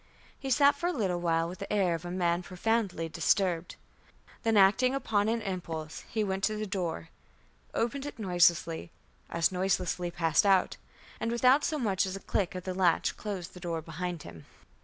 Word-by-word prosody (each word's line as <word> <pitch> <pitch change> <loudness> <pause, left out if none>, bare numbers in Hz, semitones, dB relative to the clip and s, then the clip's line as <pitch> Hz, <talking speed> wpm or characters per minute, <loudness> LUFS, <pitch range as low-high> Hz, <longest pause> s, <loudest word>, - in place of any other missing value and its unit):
He 270 - -5
sat 285 +2 +5
for 340 +4 -2
a - - +1
little 185 - -1
while 165 -1 +1
with 180 +2 -8
the 200 - -6
air 195 -4 +2
of 165 +1 -4
a - - -4
man 175 -1 0
profoundly 185 -2 -1
disturbed. 170 +1 0 0.7
Then, 225 -1 +2
acting 250 +7 +5
upon 215 -6 +1
an 230 0 -1
impulse, 165 -5 -5
he 220 - 0
went 195 -1 -2
to 215 - -1
the 215 0 -3
door, 175 - -3 0.7
opened 270 +5 -1
it 290 - -8
noiselessly, 175 -4 +2 0.4
as 170 +1 +1
noiselessly 180 -1 0
passed 165 -2 +2
out, 190 -2 +3 0.4
and, 230 - -1
without 255 +4 +4
so 310 - 0
much 200 -7 +1
as 190 - -4
a - - -5
click 190 -1 -1
of 180 - -5
the 185 - -3
latch, 180 -2 +2
closed 195 -5 -5
the 180 - -10
door 170 -2 -3
behind 170 0 -5
him. 80 -3 -12
185 Hz, 185 wpm, -30 LUFS, 170-215 Hz, 0.7 s, sat